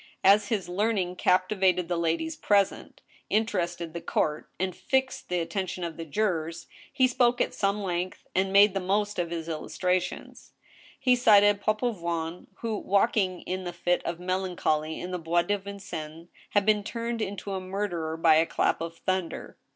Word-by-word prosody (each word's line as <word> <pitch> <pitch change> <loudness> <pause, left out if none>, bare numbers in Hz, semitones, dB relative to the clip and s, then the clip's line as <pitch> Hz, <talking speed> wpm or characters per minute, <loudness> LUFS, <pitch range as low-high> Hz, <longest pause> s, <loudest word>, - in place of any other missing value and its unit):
As 205 +2 +6
his 210 -6 -1
learning 185 -1 0
captivated 185 -1 +2
the 175 - -1
ladies 170 - -1
present, 200 -9 0 0.3
interested 175 -6 -1
the 170 - -5
couft, 150 -2 -1
and^ 185 0 -1
fixed 265 +2 -1
the 180 0 0
attention 185 +1 -3
of 170 -2 -4
the 165 - -6
jurors, 165 -2 -1 0.3
he 260 - +3
spoke 245 -1 +2
at - - 0
some 200 +1 0
length, 180 0 -3
and 190 +1 +1
made 200 0 +6
the 195 - 0
most 205 +2 0
of 170 -1 -1
his 165 -1 -4
illustrations. 180 +3 -3 0.5
He 250 -2 +4
cited 205 -4 +5
Papavoine, 175 -7 -2
who, 225 -2 -2
walking 195 -2 +1
in 185 0 -4
a - - -3
fit 175 +1 0
of 170 0 -4
melancholy 180 -4 -1
in 180 - -5
the 180 - -2
Bois 170 +1 +1
de 205 +2 0
Vincennes, 175 -5 -8 0.2
had 205 -1 +2
been 210 -1 +3
turned 230 +1 -3
into 200 -1 -4
a 190 - -2
murderer 185 -4 -3
by 160 -1 +5
a 165 +1 +3
clap - - +1
of 165 0 -5
thunder. 185 -3 -3
185 Hz, 165 wpm, -27 LUFS, 170-205 Hz, 0.5 s, As